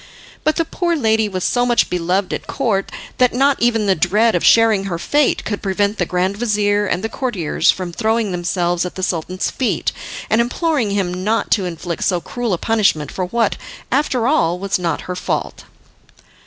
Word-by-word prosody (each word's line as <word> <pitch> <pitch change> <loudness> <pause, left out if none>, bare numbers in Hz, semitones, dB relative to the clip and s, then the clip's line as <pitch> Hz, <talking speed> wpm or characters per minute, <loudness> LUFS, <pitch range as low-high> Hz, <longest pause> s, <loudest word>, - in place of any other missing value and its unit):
But 310 - +2
the 330 - 0
poor 345 +1 -1
lady 220 -6 +1
was 185 -2 -3
so 245 - +1
much 240 -1 +3
beloved 180 +2 -1
at - - -5
Court 215 -8 -1 0.3
that 250 -1 +3
not 275 +2 +2
even 230 -3 +2
the 195 - +4
dread 210 +7 +2
of - - 0
sharing 225 -4 +5
her 180 -4 -3
fate 290 - +1
could 205 -1 -3
prevent 200 +2 0
the 180 - 0
grand 185 +2 0
vizir 205 -2 +1
and 185 +1 -1
the - - 0
courtiers 200 - -1
from 180 -2 0
throwing 220 0 0
themselves 175 0 0
at 180 - -5
the 185 - -5
Sultan's 180 +1 -2
feet 260 - -1 0.4
and 220 - +3
imploring 265 -1 0
him 185 -2 -2
not 220 +3 0
to 195 -4 +2
inflict 170 -1 -4
so 180 -2 +1
cruel 240 +7 -4
a - - 0
punishment 195 - +1
for 185 - -2
what, 225 +3 0 0.3
after 260 -3 +1
all, 180 - +2
was 195 0 -1
not 170 -2 -1
her 180 - -5
fault. 180 - -3
205 Hz, 190 wpm, -18 LUFS, 180-235 Hz, 0.4 s, sharing